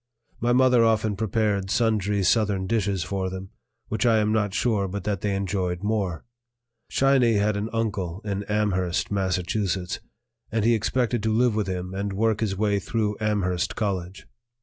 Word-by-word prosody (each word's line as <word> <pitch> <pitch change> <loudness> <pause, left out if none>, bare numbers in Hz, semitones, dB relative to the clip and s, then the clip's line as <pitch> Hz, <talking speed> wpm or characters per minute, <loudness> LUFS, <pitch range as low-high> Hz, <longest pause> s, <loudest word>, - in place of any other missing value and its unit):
My 120 +1 +1
mother 125 -1 +5
often 110 -2 +2
prepared 105 -2 0
sundry 105 -2 +1
Southern 100 -1 +2
dishes 100 -4 0
for 95 +1 -2
them, 95 +1 -7 0.4
which 110 - -1
I 115 -2 +4
am 105 0 +2
not 105 -2 +1
sure 105 -1 +1
but 100 +1 -5
that 100 -2 -2
they 100 -2 0
enjoyed 95 -2 -2
more. 100 -6 -1 0.6
"Shiny" 135 -4 +3
had 105 0 +2
an 105 +2 -2
uncle 105 -6 -2
in 100 -1 -2
Amherst, 95 -5 0
Mass., 95 -2 +1 1.1
and 110 -1 0
he 120 - +5
expected 120 +1 0
to 110 +1 0
live 120 +1 +3
with 105 -2 -1
him 90 0 -4
and 100 +1 -3
work 110 +1 +1
his 100 -4 -1
way 100 -1 +1
through 105 +1 -1
Amherst 100 -3 0
College. 95 -4 -3
105 Hz, 165 wpm, -25 LUFS, 95-110 Hz, 1.1 s, mother